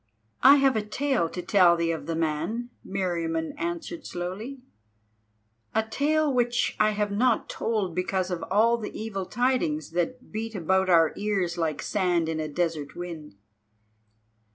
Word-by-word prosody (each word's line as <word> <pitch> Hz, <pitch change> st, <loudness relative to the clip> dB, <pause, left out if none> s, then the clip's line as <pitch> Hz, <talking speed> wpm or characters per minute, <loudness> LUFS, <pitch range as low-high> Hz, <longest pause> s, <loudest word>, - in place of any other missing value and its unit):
"I 275 Hz, +2 st, +9 dB
have 275 Hz, -2 st, +3 dB
a 220 Hz, -, +1 dB
tale 215 Hz, -3 st, 0 dB
to 180 Hz, -, -6 dB
tell 175 Hz, -1 st, +5 dB
thee 170 Hz, 0 st, +1 dB
of 165 Hz, -, -5 dB
the 165 Hz, -, -1 dB
man," 165 Hz, +10 st, -2 dB
Meriamun 170 Hz, -4 st, -2 dB
answered 340 Hz, -1 st, -4 dB
slowly, 210 Hz, +10 st, -5 dB, 1.1 s
"a 220 Hz, -, +3 dB
tale 295 Hz, +5 st, +1 dB
which 240 Hz, -1 st, +1 dB
I 215 Hz, -, +5 dB
have 210 Hz, -1 st, -1 dB
not 230 Hz, +3 st, +2 dB
told 210 Hz, -6 st, -1 dB
because 185 Hz, +1 st, -1 dB
of 175 Hz, -2 st, -2 dB
all 230 Hz, +4 st, +3 dB
the 215 Hz, -, -6 dB
evil 195 Hz, -4 st, -4 dB
tidings 240 Hz, -, 0 dB
that 210 Hz, +10 st, -3 dB
beat 225 Hz, +1 st, -4 dB
about 190 Hz, +1 st, +1 dB
our 165 Hz, -3 st, +5 dB
ears 195 Hz, -4 st, -1 dB
like 160 Hz, -3 st, -2 dB
sand 175 Hz, -5 st, +1 dB
in 160 Hz, -1 st, -2 dB
a 155 Hz, -, -2 dB
desert 155 Hz, -2 st, -2 dB
wind." 165 Hz, -, -7 dB
190 Hz, 155 wpm, -26 LUFS, 170-235 Hz, 1.1 s, I